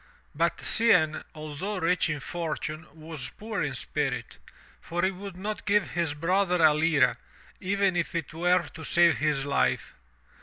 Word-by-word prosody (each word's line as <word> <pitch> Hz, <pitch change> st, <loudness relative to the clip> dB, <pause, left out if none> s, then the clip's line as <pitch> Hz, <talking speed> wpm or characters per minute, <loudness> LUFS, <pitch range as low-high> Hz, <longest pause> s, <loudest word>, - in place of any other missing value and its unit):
But -, -, +1 dB
Cianne, 180 Hz, -9 st, +3 dB
although 155 Hz, +7 st, -5 dB
rich 180 Hz, 0 st, +1 dB
in 150 Hz, -1 st, -2 dB
fortune, 160 Hz, -1 st, -4 dB
was 155 Hz, -5 st, -7 dB
poor 220 Hz, +1 st, -4 dB
in -, -, -2 dB
spirit, -, -, -3 dB, 0.4 s
for 175 Hz, 0 st, -3 dB
he 190 Hz, -, +3 dB
would 195 Hz, -1 st, -9 dB
not 210 Hz, +3 st, -5 dB
give 205 Hz, 0 st, +2 dB
his 170 Hz, -4 st, -1 dB
brother 180 Hz, +3 st, +1 dB
a 155 Hz, -2 st, +6 dB
lira, 150 Hz, -6 st, +3 dB, 0.4 s
even 195 Hz, 0 st, +1 dB
if 175 Hz, 0 st, -1 dB
it 165 Hz, -3 st, -3 dB
were 175 Hz, +1 st, +2 dB
to 160 Hz, -, -10 dB
save 170 Hz, +1 st, +4 dB
his 150 Hz, -3 st, 0 dB
life. 140 Hz, -1 st, 0 dB
170 Hz, 155 wpm, -27 LUFS, 155-185 Hz, 0.4 s, a